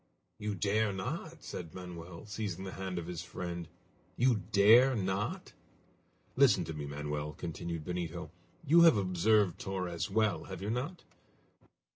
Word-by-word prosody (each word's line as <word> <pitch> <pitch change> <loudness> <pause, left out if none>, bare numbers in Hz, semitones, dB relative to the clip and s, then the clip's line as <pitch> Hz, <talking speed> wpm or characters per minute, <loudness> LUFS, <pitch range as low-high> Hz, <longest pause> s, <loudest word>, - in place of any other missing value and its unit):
"You 105 -1 -2
dare 105 +3 +1
not?" 155 - -5
said 85 -3 -7
Manoel, 90 0 -8
seizing 100 -3 -4
the 95 - -5
hand 95 -1 -4
of 85 - -3
his 85 -2 -5
friend. 85 -1 -5 0.5
"You 120 -4 +3
dare 115 +6 +7
not?" 95 0 -2 0.8
"Listen 125 -9 +5
to 80 - -5
me, 75 -2 -5
Manoel," 75 +1 -4
continued 85 -1 -5
Benito. 85 -2 -4 0.3
"You 165 +4 +6
have 165 -9 +7
observed 95 0 +2
Torres 90 -4 -3
well, 110 +1 +1
have 95 -2 -7
you 100 +3 -3
not? 140 +10 -3
95 Hz, 140 wpm, -32 LUFS, 85-110 Hz, 0.8 s, dare